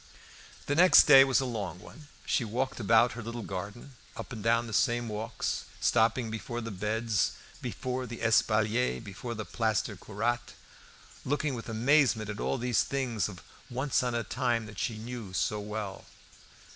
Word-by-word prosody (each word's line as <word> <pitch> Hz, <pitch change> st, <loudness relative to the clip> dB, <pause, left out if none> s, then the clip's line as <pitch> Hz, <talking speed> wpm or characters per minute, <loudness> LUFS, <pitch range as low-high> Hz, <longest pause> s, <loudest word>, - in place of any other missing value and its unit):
The 145 Hz, -, 0 dB
next 180 Hz, +4 st, +8 dB
day 135 Hz, -3 st, +9 dB
was 135 Hz, -1 st, +3 dB
a -, -, -2 dB
long 100 Hz, -8 st, -4 dB
one. 150 Hz, +9 st, -14 dB, 0.2 s
She -, -, +1 dB
walked 125 Hz, +4 st, -2 dB
about 115 Hz, +2 st, +4 dB
her 120 Hz, -, -7 dB
little 115 Hz, +1 st, -6 dB
garden, 100 Hz, +8 st, -7 dB, 0.2 s
up -, -, -7 dB
and 110 Hz, -, -6 dB
down 115 Hz, +2 st, +2 dB
the 115 Hz, -, -7 dB
same 120 Hz, +1 st, +2 dB
walks, 110 Hz, +2 st, -3 dB
stopping 115 Hz, +1 st, +2 dB
before 120 Hz, +2 st, -4 dB
the 115 Hz, -1 st, -5 dB
beds, 105 Hz, +2 st, 0 dB, 0.3 s
before 130 Hz, 0 st, -4 dB
the 115 Hz, 0 st, -7 dB
espalier, 110 Hz, +1 st, +2 dB
before 115 Hz, +3 st, -7 dB
the 110 Hz, -1 st, -5 dB
plaster 110 Hz, -2 st, -1 dB
curate, 115 Hz, +5 st, -3 dB, 0.7 s
looking 145 Hz, +1 st, -1 dB
with 115 Hz, -1 st, -6 dB
amazement 115 Hz, -2 st, +2 dB
at 105 Hz, -, -7 dB
all -, -, -1 dB
these 125 Hz, -2 st, +1 dB
things 125 Hz, -6 st, -1 dB
of 90 Hz, -4 st, -11 dB, 0.3 s
once 130 Hz, +3 st, 0 dB
on 125 Hz, -1 st, -1 dB
a 115 Hz, -, 0 dB
time 120 Hz, -2 st, -1 dB
that 105 Hz, -2 st, -9 dB
she 110 Hz, -, -2 dB
knew 115 Hz, -3 st, -7 dB
so 105 Hz, +3 st, 0 dB
well. 105 Hz, -1 st, -5 dB
115 Hz, 170 wpm, -29 LUFS, 110-125 Hz, 0.7 s, day